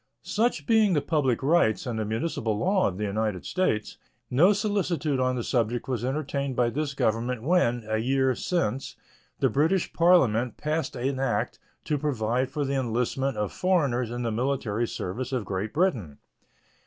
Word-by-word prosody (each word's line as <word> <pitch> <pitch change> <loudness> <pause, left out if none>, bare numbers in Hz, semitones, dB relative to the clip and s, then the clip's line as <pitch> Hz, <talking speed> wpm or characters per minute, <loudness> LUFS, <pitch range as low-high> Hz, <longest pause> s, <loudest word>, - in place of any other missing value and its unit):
Such 235 +3 0
being 220 -4 +4
the 150 - +3
public 140 -5 0
rights 145 -7 +3
and 120 -3 -3
the 110 - -1
municipal 110 -1 -2
law 190 - +2
of 95 - -4
the 105 - -3
United 105 -2 -2
States, 145 - -1 0.3
no 160 +11 +5
solicitude 185 -9 0
on 130 0 +1
the 120 - -2
subject 120 -1 -1
was 125 -3 -2
entertained 140 0 -2
by 120 -1 +2
this 145 +1 -2
Government 115 0 0
when, 130 -7 +2
a 110 0 0
year 130 +2 +2
since, 135 - -2 0.5
the - - +5
British 160 +6 +1
Parliament 130 -10 +3
passed 155 -1 -2
an 130 +2 -2
act 135 - -1 0.2
to 150 -2 -1
provide 130 -3 0
for 145 +1 -2
the 140 - -2
enlistment 125 +2 -1
of 105 -1 -1
foreigners 140 -11 +1
in 120 +1 -4
the 115 - -1
military 120 -2 -1
service 120 +9 -4
of 125 -5 -2
Great 100 +2 -3
Britain. 125 - 0
130 Hz, 165 wpm, -26 LUFS, 115-155 Hz, 0.5 s, no